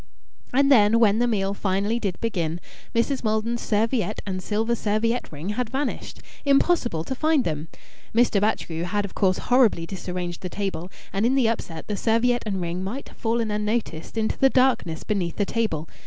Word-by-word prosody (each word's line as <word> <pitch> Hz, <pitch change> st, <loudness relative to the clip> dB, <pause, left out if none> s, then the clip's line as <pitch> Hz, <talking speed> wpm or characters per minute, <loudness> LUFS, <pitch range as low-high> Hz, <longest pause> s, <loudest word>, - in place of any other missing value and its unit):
And 275 Hz, +2 st, +3 dB
then, 225 Hz, -2 st, +6 dB
when 220 Hz, -1 st, +4 dB
the 245 Hz, -, +3 dB
meal 200 Hz, -4 st, 0 dB
finally 200 Hz, +3 st, 0 dB
did 200 Hz, -6 st, -3 dB
begin 175 Hz, -7 st, -1 dB, 0.4 s
Mrs. 255 Hz, +3 st, +1 dB
Maldon's 220 Hz, +2 st, 0 dB
serviette 215 Hz, -1 st, 0 dB
and 185 Hz, -2 st, -3 dB
silver 220 Hz, +4 st, 0 dB
serviette 230 Hz, +2 st, 0 dB
ring 155 Hz, +5 st, -6 dB
had 220 Hz, +2 st, -2 dB
vanished. 270 Hz, +2 st, -3 dB, 0.2 s
Impossible 275 Hz, -, +2 dB
to 265 Hz, -, -4 dB
find 310 Hz, 0 st, +2 dB
them! 155 Hz, -3 st, -3 dB, 0.4 s
Mr. 230 Hz, -3 st, +3 dB
Batchgrew 175 Hz, -6 st, -1 dB
had 205 Hz, +3 st, -1 dB
of 195 Hz, -, -9 dB
course 185 Hz, -2 st, +2 dB
horribly 245 Hz, -9 st, +3 dB
disarranged 180 Hz, -1 st, -5 dB
the 185 Hz, -, -4 dB
table, 190 Hz, -2 st, -4 dB, 0.2 s
and 195 Hz, +2 st, 0 dB
in 250 Hz, +3 st, +3 dB
the 260 Hz, -4 st, +3 dB
upset 165 Hz, -8 st, -3 dB
the 210 Hz, -, -2 dB
serviette 235 Hz, +3 st, +2 dB
and 195 Hz, -2 st, -1 dB
ring 175 Hz, +1 st, -3 dB
might 235 Hz, +9 st, -5 dB
have -, -, -18 dB
fallen 225 Hz, -1 st, 0 dB
unnoticed 210 Hz, -4 st, -2 dB
into 220 Hz, -1 st, 0 dB
the 270 Hz, -, +6 dB
darkness 245 Hz, -12 st, +2 dB
beneath 185 Hz, -6 st, -1 dB
the 205 Hz, -, +1 dB
table. 195 Hz, -9 st, -1 dB
215 Hz, 180 wpm, -24 LUFS, 185-235 Hz, 0.4 s, then